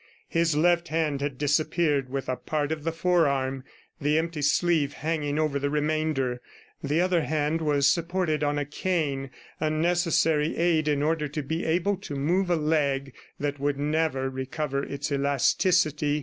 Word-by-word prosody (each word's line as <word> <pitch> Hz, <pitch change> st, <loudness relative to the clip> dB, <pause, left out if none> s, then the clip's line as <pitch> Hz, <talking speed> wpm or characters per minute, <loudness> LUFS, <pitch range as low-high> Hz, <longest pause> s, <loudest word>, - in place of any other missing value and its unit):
His 165 Hz, -2 st, +1 dB
left 170 Hz, +2 st, +3 dB
hand 155 Hz, -3 st, -1 dB
had 140 Hz, -2 st, -3 dB
disappeared 145 Hz, -1 st, +1 dB
with 135 Hz, 0 st, -4 dB
a 130 Hz, -, 0 dB
part 150 Hz, +2 st, -2 dB
of 155 Hz, -2 st, -3 dB
the 165 Hz, -, 0 dB
forearm, 140 Hz, -6 st, +1 dB, 0.4 s
the 150 Hz, +2 st, +2 dB
empty 165 Hz, -1 st, -2 dB
sleeve 150 Hz, 0 st, +2 dB
hanging 150 Hz, -1 st, -2 dB
over 155 Hz, -2 st, 0 dB
the 140 Hz, +1 st, -1 dB
remainder. 150 Hz, -4 st, -1 dB, 0.4 s
The 150 Hz, +1 st, 0 dB
other 180 Hz, -1 st, +2 dB
hand 155 Hz, +1 st, -1 dB
was 145 Hz, -3 st, +2 dB
supported 170 Hz, -1 st, +1 dB
on 145 Hz, 0 st, 0 dB
a 145 Hz, -, -1 dB
cane, 145 Hz, -3 st, -2 dB, 0.3 s
a 155 Hz, -, +1 dB
necessary 165 Hz, -1 st, +1 dB
aid 165 Hz, -3 st, +2 dB
in 145 Hz, -1 st, +1 dB
order 155 Hz, -1 st, 0 dB
to 150 Hz, +1 st, -4 dB
be 160 Hz, +5 st, -3 dB
able 180 Hz, +5 st, +1 dB
to 175 Hz, -7 st, -7 dB
move 175 Hz, +7 st, +1 dB
a 175 Hz, -, +3 dB
leg 145 Hz, -4 st, 0 dB, 0.3 s
that 145 Hz, -1 st, -2 dB
would 140 Hz, 0 st, 0 dB
never 150 Hz, -2 st, 0 dB
recover 135 Hz, +2 st, -3 dB
its 140 Hz, +1 st, -4 dB
elasticity. 150 Hz, +2 st, +2 dB
150 Hz, 165 wpm, -26 LUFS, 140-165 Hz, 0.4 s, left